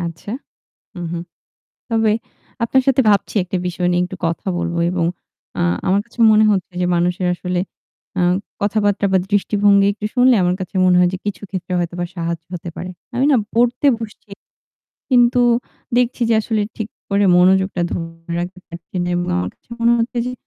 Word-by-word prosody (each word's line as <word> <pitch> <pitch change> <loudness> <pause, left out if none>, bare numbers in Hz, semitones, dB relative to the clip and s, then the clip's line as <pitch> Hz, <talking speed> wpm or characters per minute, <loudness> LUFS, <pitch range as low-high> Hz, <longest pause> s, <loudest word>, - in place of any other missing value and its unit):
আচ্ছা। 170 +3 -6 0.7
হু, - - -7
হুম। 170 0 -4 0.7
তবে 225 -1 +2 0.5
আপনার 265 +3 +3
সাথে 265 0 +4
ভাবছি 205 +1 +1
একটা 180 +1 -3
বিষয় 175 0 -1
নিয়ে 175 0 +2
একটু 185 +1 -8
কথা 165 +3 -3
বলব 170 0 -2 0.2
এবং 175 -2 0 0.5
আ - - +1 0.3
আমার 195 +2 +3
কাছে 235 0 -19
মনে 215 0 +5
হচ্ছে 190 -2 -1
যে 180 - +2
মানুষের 175 +1 0
আসলে 180 0 -2 0.6
আ - - +2 0.4
কথাবার্তা 205 0 +1
বা 190 - +5
দৃষ্টিভঙ্গি 205 0 +3
একটু 210 0 -6
শুনলে 250 -1 +5
আমার 180 0 +2
কাছে 185 +1 -7
মনে 180 - +5
হয় 180 0 +4
যে 185 - -2
কিছু 205 -2 -3
ক্ষেত্রে 185 -1 -4
হয়তোবা 175 0 -2
সাহায্য 170 -1 -3
হতে 175 -1 -5
পারে। 180 - -6 0.3
আমি 260 +3 +2
না - - +5 0.2
পড়তে 245 +4 +2
বসছি 215 -2 -9 0.8
কিন্তু 245 0 +4 0.6
দেখছি 245 0 +1
যে - - +5
আসলে 220 0 -1 0.2
ঠিক 220 -2 -4 0.2
করে 200 +1 +3
মনোযোগটা 190 +1 +3
ধরে 165 0 -6
রাখতে 180 +1 -6
পারছি 170 +1 -12
না - - -2
এবং 175 0 -1
আমার 90 +1 -1
কাছে - - -43
মনে 235 +1 +4
হচ্ছে 235 +1 -1
যে 250 - -3
190 Hz, 175 wpm, -19 LUFS, 175-220 Hz, 0.8 s, মনে